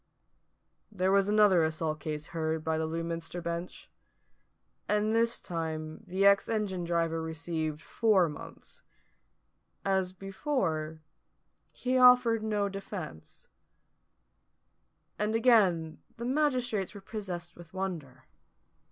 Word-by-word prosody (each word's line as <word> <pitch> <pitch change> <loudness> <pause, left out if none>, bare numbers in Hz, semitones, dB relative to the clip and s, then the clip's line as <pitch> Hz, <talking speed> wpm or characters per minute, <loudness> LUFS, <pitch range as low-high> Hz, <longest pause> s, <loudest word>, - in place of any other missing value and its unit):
There 190 -2 +1
was 195 0 +3
another 205 -5 +5
assault 155 -1 -1
case 150 +1 -5
heard 160 -1 -2
by 160 0 0
the 160 - -1
Lewminster 165 +1 -4
bench; 170 +1 -5 1.0
and 210 +1 +2
this 230 +1 +2
time 160 -2 -5
the 190 +2 +1
ex 200 0 +5
engine 200 -5 -1
driver 165 -1 0
received 160 -1 -3
four 210 -6 +3
months. 150 -2 -10 1.0
As 190 -2 +1
before, 185 - -2 0.7
he 255 +1 0
offered 250 -3 +6
no 210 -2 0
defence: 195 - -8 1.7
and 210 +1 0
again 195 -9 +3 0.2
the 235 - -5
magistrates 250 -8 0
were 200 - -8
possessed 180 -5 -6
with 170 -2 -13
wonder. 165 -9 -5
180 Hz, 110 wpm, -30 LUFS, 160-210 Hz, 1.7 s, offered